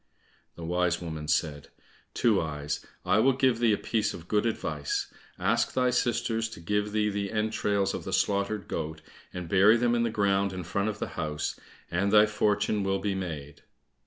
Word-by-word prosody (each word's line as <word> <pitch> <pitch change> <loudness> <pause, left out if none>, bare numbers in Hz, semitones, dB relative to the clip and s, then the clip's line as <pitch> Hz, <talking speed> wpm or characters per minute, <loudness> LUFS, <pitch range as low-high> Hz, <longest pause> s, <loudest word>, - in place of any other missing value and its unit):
The 85 - -7
wise 90 0 +1
woman 80 -3 -6
said, 75 -2 0 0.5
"Two 110 -4 +3
eyes, 75 -2 -4 0.2
I 100 - +3
will 135 +4 +4
give 130 -3 +2
thee 120 -2 +4
a 105 - +2
piece 110 -2 -1
of 85 - -11
good 105 +3 +2
advice; 75 -10 -2 0.2
ask - - +1
thy 125 -1 +2
sisters 115 -2 0
to 110 - -10
give 105 +4 -1
thee 105 0 +1
the 100 -1 -3
entrails 105 -2 0
of - - -4
the - - -5
slaughtered 100 -1 0
goat, 80 +1 -4 0.3
and 90 -2 -6
bury 100 +6 +6
them 120 0 +2
in 120 - +2
the 115 - +1
ground 100 -2 +1
in 90 -1 -5
front 100 +5 -1
of 105 - -4
the - - -4
house, 75 -1 -3 0.3
and 95 +3 +1
thy 105 0 +7
fortune 105 0 +1
will 95 0 +1
be 100 +1 -1
made." 80 -7 -6
100 Hz, 190 wpm, -28 LUFS, 85-110 Hz, 0.5 s, thy